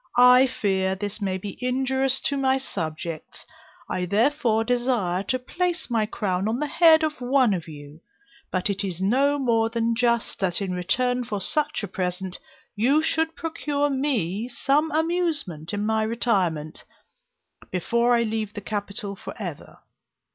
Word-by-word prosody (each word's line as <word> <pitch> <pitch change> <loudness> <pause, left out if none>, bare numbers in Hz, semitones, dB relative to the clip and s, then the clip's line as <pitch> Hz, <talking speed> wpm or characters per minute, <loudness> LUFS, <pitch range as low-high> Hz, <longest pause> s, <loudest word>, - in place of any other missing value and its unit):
I 250 +1 +7
fear 190 -5 0
this 205 +2 -5
may 190 -2 -1
be 195 +1 -8
injurious 265 +1 +1
to 280 - 0
my 265 -1 +2
subjects; 165 - -5 0.4
I 180 - -2
therefore 225 - +2
desire 240 -7 0
to 230 +6 -1
place 350 +4 -2
my 220 -2 +1
crown 195 -2 -1
on 225 +2 0
the 300 - -1
head 320 +1 +5
of 305 -4 -2
one 250 -3 +3
of 175 -3 -4
you, 145 0 -11 0.5
but 185 -1 0
it 200 0 -1
is 185 -3 -4
no 270 +9 +2
more 230 -4 +2
than 230 0 0
just, 235 -1 0
that 180 -3 0
in 195 -2 -2
return 245 +8 0
for 215 -4 -3
such 295 +5 -1
a - - -2
present, 180 0 -3 0.4
you 270 +9 +3
should 320 0 0
procure 290 -3 -1
me 235 - -1
some 285 +6 +1
amusement 315 - -1
in 205 0 -2
my 220 0 +1
retirement, 190 -9 -1 0.9
before 235 +7 +2
I 235 - +3
leave 220 -1 -3
the - - -3
Capital 205 -1 -4
for - - -9
ever. - - -7
225 Hz, 155 wpm, -25 LUFS, 190-265 Hz, 0.9 s, I